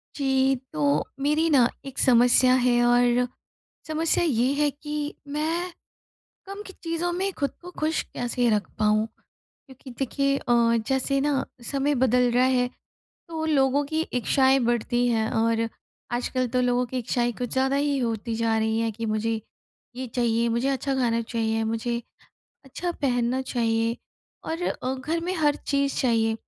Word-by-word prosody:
जी, 270 Hz, -1 st, +2 dB, 0.2 s
तो 145 Hz, -1 st, +1 dB
मेरी 300 Hz, +4 st, +2 dB
ना 255 Hz, -5 st, +5 dB, 0.2 s
एक 270 Hz, -1 st, -7 dB
समस्या 250 Hz, +1 st, +5 dB
है 240 Hz, -1 st, +4 dB
और 245 Hz, 0 st, +3 dB, 0.6 s
समस्या 315 Hz, +2 st, +1 dB
ये 250 Hz, -7 st, +2 dB
है 295 Hz, +1 st, +2 dB
कि 295 Hz, +1 st, -5 dB
मैं 325 Hz, +5 st, -2 dB, 0.8 s
कम 395 Hz, +1 st, -7 dB
की 385 Hz, -, -10 dB
चीज़ों 335 Hz, +1 st, -1 dB
में 385 Hz, +3 st, -1 dB
खुद 280 Hz, -2 st, 0 dB
को 355 Hz, -, -9 dB
खुश 315 Hz, +1 st, +1 dB
कैसे 245 Hz, 0 st, -1 dB
रख 210 Hz, -3 st, 0 dB
पाऊँ? 215 Hz, 0 st, +2 dB, 0.6 s
क्योंकि 265 Hz, -1 st, -13 dB
देखिए 275 Hz, +1 st, 0 dB
अ, 235 Hz, -2 st, +3 dB
जैसे 270 Hz, +1 st, +1 dB
ना 275 Hz, -1 st, +1 dB, 0.3 s
समय 280 Hz, +1 st, +1 dB
बदल 250 Hz, -1 st, +3 dB
रहा 250 Hz, +1 st, +4 dB
है 255 Hz, -1 st, +2 dB, 0.6 s
तो 320 Hz, -1 st, -4 dB
लोगों 280 Hz, -2 st, +2 dB
की 315 Hz, +2 st, -2 dB
इच्छाएँ 265 Hz, +2 st, +3 dB
बढ़ती 240 Hz, +1 st, +1 dB
हैं 220 Hz, -2 st, +1 dB
और 225 Hz, 0 st, +1 dB, 0.4 s
आजकल 250 Hz, +1 st, -1 dB
तो 250 Hz, +2 st, 0 dB
लोगों 245 Hz, 0 st, +1 dB
की 255 Hz, +2 st, -4 dB
इच्छाएँ 240 Hz, 0 st, 0 dB
कुछ 245 Hz, -2 st, -3 dB
ज़्यादा 265 Hz, +1 st, +1 dB
ही 285 Hz, 0 st, +1 dB
होती 230 Hz, -2 st, -2 dB
जा 225 Hz, -1 st, +1 dB
रही 220 Hz, 0 st, 0 dB
हैं 225 Hz, -1 st, 0 dB
कि 225 Hz, +2 st, -5 dB
मुझे 220 Hz, +1 st, -1 dB, 0.6 s
ये 260 Hz, 0 st, -4 dB
चाहिए, 235 Hz, -1 st, +1 dB
मुझे 235 Hz, +3 st, 0 dB
अच्छा 275 Hz, 0 st, -1 dB
खाना 235 Hz, -3 st, +1 dB
चाहिए, 225 Hz, -1 st, -1 dB
मुझे 230 Hz, +2 st, -2 dB, 0.6 s
अच्छा 345 Hz, +6 st, -4 dB
पहनना 250 Hz, -1 st, +1 dB
चाहिए 230 Hz, -2 st, 0 dB, 0.5 s
और 330 Hz, +2 st, -3 dB
अ, 260 Hz, -6 st, -2 dB
घर 305 Hz, +6 st, -2 dB
में 360 Hz, +2 st, -2 dB
हर 295 Hz, -3 st, +2 dB
चीज़ 280 Hz, -1 st, 0 dB
चाहिए। 225 Hz, -3 st, +2 dB
255 Hz, 160 wpm, -25 LUFS, 235-285 Hz, 0.8 s, ना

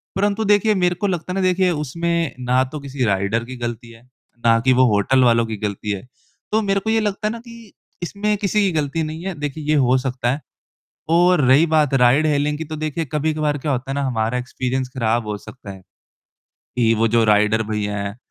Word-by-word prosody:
परंतु 205 Hz, +2 st, 0 dB
देखिए, 210 Hz, +1 st, +3 dB
मेरे 180 Hz, -2 st, +1 dB
को 205 Hz, +3 st, -2 dB
लगता 180 Hz, -1 st, -3 dB
है -, -, -3 dB
ना 195 Hz, -, 0 dB
देखिए 185 Hz, 0 st, +2 dB
उसमें 170 Hz, +1 st, -2 dB
ना 125 Hz, +1 st, +2 dB
तो 150 Hz, -, -5 dB
किसी 140 Hz, -2 st, -4 dB
राइडर 100 Hz, +3 st, 0 dB
की 130 Hz, +2 st, -8 dB
गलती 120 Hz, -1 st, -5 dB
है 115 Hz, 0 st, -16 dB, 0.4 s
ना 115 Hz, 0 st, +5 dB
कि 130 Hz, -, +5 dB
वो 130 Hz, +1 st, +4 dB
होटल 130 Hz, +6 st, +3 dB
वालों 115 Hz, -1 st, +4 dB
की 110 Hz, -1 st, -5 dB
गलती 105 Hz, 0 st, -3 dB
है। 100 Hz, +3 st, -5 dB, 0.4 s
तो 220 Hz, +1 st, +2 dB
मेरे 195 Hz, -1 st, +1 dB
को 220 Hz, -, -4 dB
ये 225 Hz, 0 st, +3 dB
लगता 210 Hz, 0 st, -1 dB
है 215 Hz, -, -1 dB
ना 230 Hz, -, -6 dB
कि 230 Hz, -2 st, -14 dB, 0.3 s
इसमें 210 Hz, +3 st, -1 dB
किसी 205 Hz, +1 st, 0 dB
की 195 Hz, -2 st, +2 dB
गलती 155 Hz, 0 st, -1 dB
नहीं 155 Hz, +2 st, -6 dB
है, 190 Hz, -, -2 dB
देखिए 150 Hz, +1 st, -4 dB
ये 155 Hz, +1 st, +1 dB
हो 130 Hz, -2 st, +3 dB
सकता 125 Hz, -1 st, -1 dB
है। 140 Hz, -, -3 dB, 0.7 s
और 175 Hz, 0 st, +4 dB
रही 140 Hz, +6 st, +6 dB
बात 155 Hz, -3 st, +2 dB
राइड 135 Hz, +4 st, +4 dB
हीलिंग 150 Hz, 0 st, 0 dB
की 160 Hz, -, -4 dB
तो 155 Hz, 0 st, -6 dB
देखिए 155 Hz, +1 st, -3 dB
कभी-कभार 150 Hz, -1 st, 0 dB
क्या 145 Hz, +1 st, -2 dB
होता 130 Hz, +1 st, -3 dB
है -, -, -2 dB
ना 140 Hz, -, -1 dB
हमारा 115 Hz, 0 st, -1 dB
एक्सपीरियंस 130 Hz, +1 st, -3 dB
ख़राब 115 Hz, -1 st, 0 dB
हो 105 Hz, -, -2 dB
सकता 110 Hz, -1 st, -11 dB
है। 95 Hz, -1 st, -10 dB, 0.8 s
कि 115 Hz, -1 st, 0 dB
वो 115 Hz, +1 st, +2 dB
जो 115 Hz, +1 st, +3 dB
राइडर 105 Hz, +1 st, +3 dB
भैया 105 Hz, -1 st, -2 dB
हैं, 100 Hz, +1 st, -4 dB
140 Hz, 225 wpm, -20 LUFS, 120-170 Hz, 0.8 s, रही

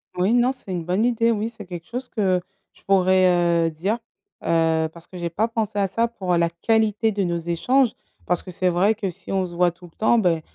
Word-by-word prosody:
Oui, 185 Hz, +5 st, +2 dB
non, 245 Hz, +1 st, +4 dB
c'est 255 Hz, -7 st, -9 dB
une 175 Hz, -2 st, -2 dB
bonne 185 Hz, +5 st, +1 dB
idée. 235 Hz, -1 st, +2 dB
Oui, 220 Hz, 0 st, -1 dB
c'est 220 Hz, -3 st, -11 dB
quelque 175 Hz, -2 st, -8 dB
chose 250 Hz, +1 st, -6 dB
que 190 Hz, -5 st, +1 dB, 0.3 s
je -, -, -24 dB
pourrais, 180 Hz, -3 st, +3 dB
heu, -, -, -2 dB
dire, 180 Hz, +8 st, -1 dB, 0.5 s
heu, 165 Hz, -1 st, +2 dB
parce 170 Hz, 0 st, -15 dB
que 185 Hz, -, -10 dB
j'ai 170 Hz, -1 st, -3 dB
pas 210 Hz, +7 st, 0 dB
pensé 220 Hz, -2 st, -3 dB
à 195 Hz, -, +2 dB
ça 230 Hz, +5 st, 0 dB
pour 185 Hz, -6 st, -2 dB
la 170 Hz, 0 st, +2 dB
qualité 220 Hz, +4 st, +1 dB
de 200 Hz, -1 st, -1 dB
nos 170 Hz, -1 st, -1 dB
échanges. 215 Hz, +10 st, +1 dB, 0.3 s
Parce 180 Hz, -1 st, 0 dB
que 185 Hz, -, -9 dB
c'est 180 Hz, +1 st, 0 dB
vrai 190 Hz, +5 st, +2 dB
que 205 Hz, -3 st, -3 dB
si -, -, -11 dB
on 190 Hz, -1 st, +1 dB
se 175 Hz, -, -9 dB
voit 175 Hz, 0 st, +3 dB
tout 175 Hz, +1 st, -16 dB
le 165 Hz, -, -17 dB
temps, 220 Hz, +2 st, +3 dB
beh, 175 Hz, -7 st, +2 dB
185 Hz, 240 wpm, -23 LUFS, 175-220 Hz, 0.5 s, non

